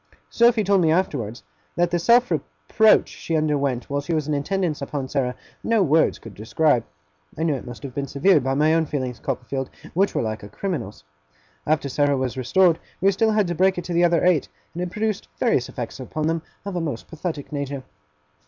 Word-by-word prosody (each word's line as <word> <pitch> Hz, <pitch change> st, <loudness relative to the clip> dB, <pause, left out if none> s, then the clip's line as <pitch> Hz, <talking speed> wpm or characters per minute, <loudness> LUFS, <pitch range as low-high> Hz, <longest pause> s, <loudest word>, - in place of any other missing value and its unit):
Sophy 235 Hz, -2 st, +4 dB
told 200 Hz, -1 st, +3 dB
me 160 Hz, -, +3 dB
afterwards, 140 Hz, -, -1 dB, 0.3 s
that 175 Hz, 0 st, +1 dB
the 175 Hz, -, +1 dB
self 240 Hz, +7 st, +4 dB
reproach 220 Hz, -1 st, +3 dB
she 165 Hz, -, -4 dB
underwent 140 Hz, -5 st, 0 dB
while 140 Hz, 0 st, -1 dB
she 165 Hz, +4 st, -3 dB
was 155 Hz, -2 st, -1 dB
in 150 Hz, -, 0 dB
attendance 155 Hz, +1 st, -1 dB
upon 140 Hz, -1 st, -3 dB
Sarah, 130 Hz, -2 st, -1 dB, 0.3 s
no 225 Hz, -3 st, +3 dB
words 160 Hz, -1 st, +3 dB
could 115 Hz, -, -11 dB
describe. 120 Hz, +4 st, +1 dB, 0.5 s
I 160 Hz, -, -1 dB
know 160 Hz, -2 st, +2 dB
it 130 Hz, -2 st, -6 dB
must 120 Hz, -3 st, -9 dB
have 135 Hz, -3 st, -6 dB
been 140 Hz, +1 st, -3 dB
severe, 150 Hz, +6 st, +4 dB
by 135 Hz, 0 st, -1 dB
my 155 Hz, +3 st, +3 dB
own 165 Hz, -1 st, +2 dB
feelings, 130 Hz, -4 st, -3 dB
Copperfield; 135 Hz, 0 st, -3 dB, 0.2 s
which 195 Hz, +4 st, +1 dB
were -, -, +1 dB
like 110 Hz, -1 st, -3 dB
a 100 Hz, -, -10 dB
criminal's. 120 Hz, -, -4 dB, 0.6 s
After 150 Hz, -2 st, +1 dB
Sarah 145 Hz, +1 st, +1 dB
was 130 Hz, -2 st, -2 dB
restored, 165 Hz, +7 st, +3 dB, 0.2 s
we 195 Hz, +2 st, +4 dB
still 220 Hz, +3 st, +2 dB
had 210 Hz, -1 st, +3 dB
to 175 Hz, -, -2 dB
break 185 Hz, +2 st, +2 dB
it 175 Hz, -, -3 dB
to 175 Hz, -, -4 dB
the 170 Hz, +1 st, +3 dB
other 170 Hz, 0 st, +3 dB
eight; 175 Hz, -5 st, +3 dB, 0.3 s
and 175 Hz, -, -5 dB
it 180 Hz, -, -2 dB
produced 215 Hz, +1 st, -2 dB
various 180 Hz, -, +1 dB
effects 120 Hz, +1 st, -6 dB
upon 150 Hz, +4 st, -3 dB
them 165 Hz, +1 st, 0 dB, 0.2 s
of 200 Hz, -2 st, -4 dB
a 175 Hz, -, -1 dB
most 145 Hz, -8 st, -4 dB
pathetic 160 Hz, -3 st, -5 dB
nature. 140 Hz, -2 st, -4 dB
155 Hz, 210 wpm, -23 LUFS, 135-180 Hz, 0.6 s, Sophy